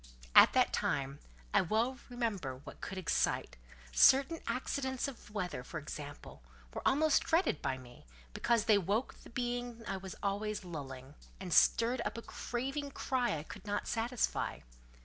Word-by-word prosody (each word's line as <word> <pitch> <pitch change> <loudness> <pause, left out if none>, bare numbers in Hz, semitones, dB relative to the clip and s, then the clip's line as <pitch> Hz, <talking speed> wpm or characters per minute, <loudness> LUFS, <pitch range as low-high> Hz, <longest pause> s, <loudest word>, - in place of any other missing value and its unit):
At - - +9
that - - +3
time, 140 0 -1 0.3
I - - +6
well 230 +7 0
remember 220 - -2
whatever 130 - -12
could 190 - -5
excite—certain 60 - +2
accidents 260 0 -1
of 270 -4 -9
the - - -15
weather, 180 -11 -3
for 155 - -6
instance, 145 -1 -7 0.6
were - - -4
almost 305 +2 +4
dreaded 330 - +2
by 130 - -1
me, 120 - -14 0.3
because 235 -2 +2
they 215 -3 +5
woke 205 +7 -1
the - - -13
being 245 -1 -3
I 195 - -2
was 190 0 -8
always 205 0 -1
lulling, 135 -5 -7 0.3
and 185 -3 -3
stirred 235 +9 +4
up - - -3
a 230 - -6
craving 275 +4 -3
cry 250 - 0
I 150 - -6
could 210 - -11
not 205 0 -1
satisfy. 235 +1 -1
210 Hz, 155 wpm, -34 LUFS, 150-245 Hz, 0.6 s, At